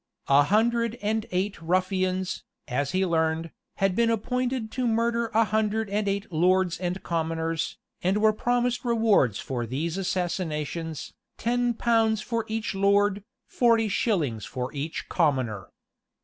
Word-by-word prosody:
A 140 +1 +7
hundred 230 +7 +2
and 215 +1 0
eight 190 +2 -2
ruffians, 185 +1 0 0.2
as 140 +1 -1
he 185 +3 +1
learned, 160 -1 0 0.2
had 195 -2 +1
been 235 +1 +3
appointed 245 +1 -1
to 250 0 -1
murder 230 +1 +1
a 225 +1 +3
hundred 215 0 0
and 205 0 0
eight 200 -1 -2
lords 180 +2 +2
and 180 +1 -3
commoners, 165 -1 -2 0.2
and 190 +3 +1
were 215 0 +4
promised 245 +2 0
rewards 220 - +3
for 120 -3 -3
these 160 - -2
assassinations, 165 -4 -3 0.2
ten 245 0 0
pounds 225 -2 +2
for 230 +1 -2
each 220 0 -2
lord, 200 +1 +2 0.2
forty 230 -2 +3
shillings 165 - 0
for 125 +2 -5
each 150 +3 -4
commoner. 130 - 0
195 Hz, 135 wpm, -26 LUFS, 165-225 Hz, 0.2 s, A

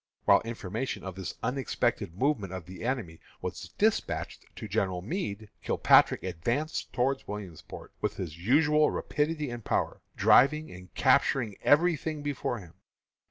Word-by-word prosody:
While - - +6
information 115 +2 -4
of 95 - -5
this 95 0 -6
unexpected 125 -8 -1
movement 110 -8 0
of 95 -3 -6
the 95 +4 -9
enemy 115 -10 -3 0.2
was - - -6
despatched - - 0
to - - -7
General 90 -2 -1
Meade, 110 - -4
Kilpatrick - - +4
advanced 120 - -2
towards 135 +2 0
Williamsport 100 -6 -8
with - - -1
his 85 -5 -5
usual 150 - +4
rapidity 150 -2 -1
and 120 -1 -6
power, - - -1
driving 150 +4 +4
and 90 0 -12
capturing 115 -7 +3
every 170 +4 +4
thing 155 0 -5
before 140 -4 -2
him. 90 -6 -12
120 Hz, 140 wpm, -29 LUFS, 95-145 Hz, 0.2 s, While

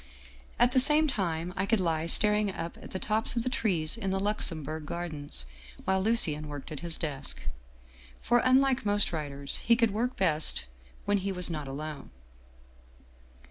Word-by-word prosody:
At 240 +1 +4
the 255 - +4
same 300 +4 +5
time 180 - -2
I 195 +1 -1
could 225 -1 +2
lie 165 -2 0
staring 210 +3 +4
up 170 -2 -6
at - - -10
the - - -4
tops 215 +5 0
of 235 - 0
the 255 - -1
trees 180 -10 0
in 215 -4 -3
the 190 0 0
Luxembourg 160 -7 -1
Gar 175 +2 -4
dens, 145 - -3 0.4
while 190 0 +1
Lucien 165 -9 +2
worked 145 -1 -8
at 150 - -5
his 170 -2 -1
desk. 135 - -3 0.8
For, 240 +1 +2
unlike 260 0 +3
most 205 -2 +1
writers, 140 -3 -4
he 235 - +3
could 230 -2 +2
work 240 +5 -2
best 155 - +1 0.4
when 205 0 +2
he 195 +1 -2
was 180 -2 +3
not 150 -3 -4
alone. 150 +2 -6
185 Hz, 175 wpm, -29 LUFS, 155-220 Hz, 0.8 s, same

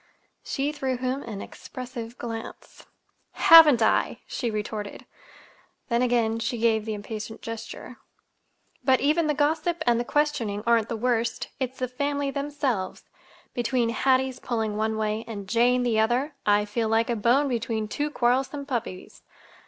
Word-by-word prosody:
She 280 +2 -1
threw 265 -4 -2
him 255 +2 -2
an 210 -6 -6
expressive 245 -2 -8
glance. 230 -1 -8 0.5
"Haven't 305 -8 +8
I!" 220 - +1
she 240 - -3
retorted. 210 -1 -5 0.8
Then 235 0 +2
again 235 -2 +1
she 235 +2 -2
gave 220 -2 +2
the 220 -1 -3
impatient 215 +1 -7
gesture. 230 -1 -7 0.9
"But 260 0 +4
even 305 +3 +2
the 300 - +1
gossip 315 +3 0
and 235 -1 +3
the - - 0
questioning 235 -7 0
aren't 230 -2 +3
the 230 - -2
worst. 235 0 -1
It's 260 -1 -3
the 255 - -2
family 285 +2 -2
themselves. 280 -8 -2 0.5
Between 240 -1 0
Hattie's 260 +1 +1
pulling 220 -4 -2
one 220 +1 -1
way 215 +1 -1
and 205 -4 -7
Jane 245 +4 +3
the 230 -3 +1
other, 245 +7 +1
I 205 0 +4
feel 220 +2 -1
like 225 +2 +2
a - - +1
bone 240 +7 +3
between 230 -3 -2
two 290 +7 -2
quarrelsome 265 +2 0
puppies. 235 -9 -5
240 Hz, 150 wpm, -26 LUFS, 220-270 Hz, 0.9 s, Haven't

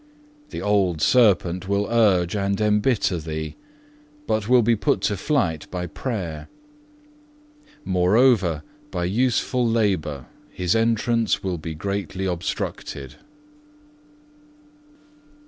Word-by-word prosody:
The - - -6
old 100 -5 +1
serpent 95 -5 +3
will 100 +1 +1
urge 100 -6 +2
and 100 0 -1
embitter 105 -3 +1
thee, 80 -1 -5 0.7
but 110 -2 -1
will 125 -1 +5
be 115 +1 +3
put 100 -2 0
to 100 - 0
flight 95 - -1
by 90 -1 -4
prayer; 85 - -5 1.4
moreover, 95 - +3 0.3
by 90 -7 -2
useful 125 +5 +1
labour 95 - 0 0.2
his 90 -1 -1
entrance 115 0 +1
will 90 -3 -2
be 80 0 -6
greatly 95 +1 -3
obstructed." 85 -5 -4
100 Hz, 100 wpm, -23 LUFS, 85-115 Hz, 1.4 s, will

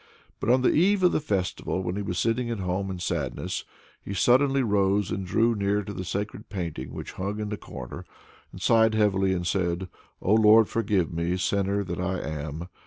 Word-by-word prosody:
But - - -2
on 125 +1 +4
the - - +4
eve 190 +4 +3
of 180 - +6
the - - +1
festival, 95 -7 -2
when 90 0 -2
he 105 - -2
was 90 -3 -3
sitting 120 +3 0
at 115 - -2
home 95 +1 -2
in 95 - -4
sadness, 90 - -3 0.4
he 100 - -5
suddenly 135 +6 +4
rose 100 -2 +1
and 95 - -2
drew 115 +5 +3
near 100 0 0
to 100 - -7
the 95 - -5
sacred 100 +4 -4
painting 85 -9 -5
which - - -7
hung 100 +3 -4
in 105 -1 -3
the 105 - -2
corner, 65 -2 -8 0.5
and - - -10
sighed 110 -1 +4
heavily, 95 -3 +2
and 90 -2 -1
said, 90 0 -1 0.3
"O 100 - +1
Lord! 110 0 +6
forgive 100 -7 0
me, 85 +2 -1
sinner 100 +2 0
that 90 -2 -5
I 95 +1 -1
am! 80 +2 -5
100 Hz, 200 wpm, -26 LUFS, 90-110 Hz, 0.5 s, of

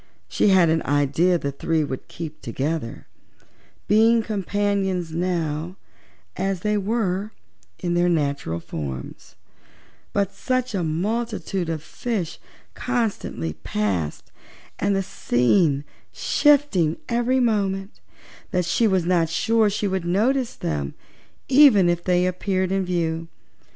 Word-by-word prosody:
She - - +1
had 185 -4 +5
an 160 0 +2
idea 145 +6 +2
the 140 -4 -3
three 160 +3 0
would 130 -3 -5
keep 160 -2 -8
together, 135 +1 -3 0.8
being 225 +2 +4
companions 200 -4 -1
now 165 -1 -2 0.6
as 190 -1 -2
they 210 +1 +1
were 205 -1 -1 0.4
in 175 -1 -2
their 175 0 +3
natural 140 - -1
forms, 70 -6 -7 0.8
but 200 -1 0
such 255 -2 -1
a 190 - 0
multitude 195 +2 -2
of 160 -2 -3
fishes 200 -4 -4 0.3
constantly 225 - -2
passed, 90 -3 -2 0.5
the 195 -1 +1
scene 140 +1 +2 0.3
shifting 280 - +2
every 240 +2 +1
moment, 200 -4 0 0.5
that 180 -1 0
she 200 +7 +2
was 190 -4 +1
not 170 -2 +2
sure 220 +5 +2
she 205 0 -1
would 190 -2 -1
notice 235 +8 +1
them 70 -3 -3 0.5
even 260 -9 +7
if 175 0 0
they 180 -1 +2
appeared 185 0 -1
in 195 0 +1
view. 165 -2 -1
180 Hz, 120 wpm, -23 LUFS, 160-210 Hz, 0.8 s, even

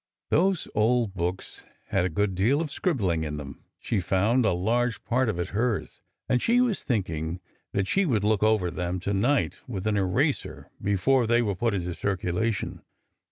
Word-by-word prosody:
Those 185 +1 +2
old 110 -1 +2
books 90 0 -4 0.3
had 95 -2 +1
a - - 0
good 100 +4 0
deal 110 +11 +2
of 160 -3 -3
scribbling 100 - 0
in 75 -1 -4
them, 70 -2 -8 0.2
she 110 - -1
found,— 100 +7 +2
a - - +3
large 115 +6 0
part 125 0 +1
of 105 - -2
it 85 - -2
hers, 110 +1 -2
— - - -60
and 125 -1 +2
she 240 +2 +3
was 245 -5 +1
thinking 85 - -2 0.3
that 100 -1 0
she 195 - +2
would 110 -8 +1
look 105 0 +2
them 110 - +5
over 95 -6 +1
to 90 +2 -2
night 125 +9 +1
with 100 -6 -5
an 105 -1 +1
eraser 120 - -1
before 115 +6 +2
they 120 +1 +3
were 105 -3 0
put 115 +3 0
into 90 -2 -2
circulation. 95 +3 -2
105 Hz, 185 wpm, -26 LUFS, 90-120 Hz, 0.3 s, them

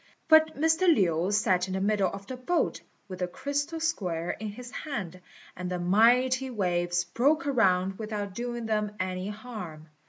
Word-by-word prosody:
But 315 -2 +5
Mr. 320 +4 +3
Lin 180 - +2
sat 190 -3 +2
in 190 - -3
the - - -1
middle 200 -1 +2
of 195 0 -8
the 255 - -6
boat, 290 +8 -1 0.3
with 185 -2 -8
the 180 - -1
crystal 285 - -3
square 180 - -1
in 220 - -6
his 240 +4 -8
hand, 210 - -5 0.3
and 180 0 -5
the 180 - -2
mighty 245 +8 +3
waves 175 -5 0
broke 280 - +1
around 195 -8 +2
without 210 -3 -4
doing 240 +2 -4
them 210 -1 -1
any 185 0 -2
harm. 205 -8 -8
210 Hz, 165 wpm, -28 LUFS, 185-255 Hz, 0.3 s, But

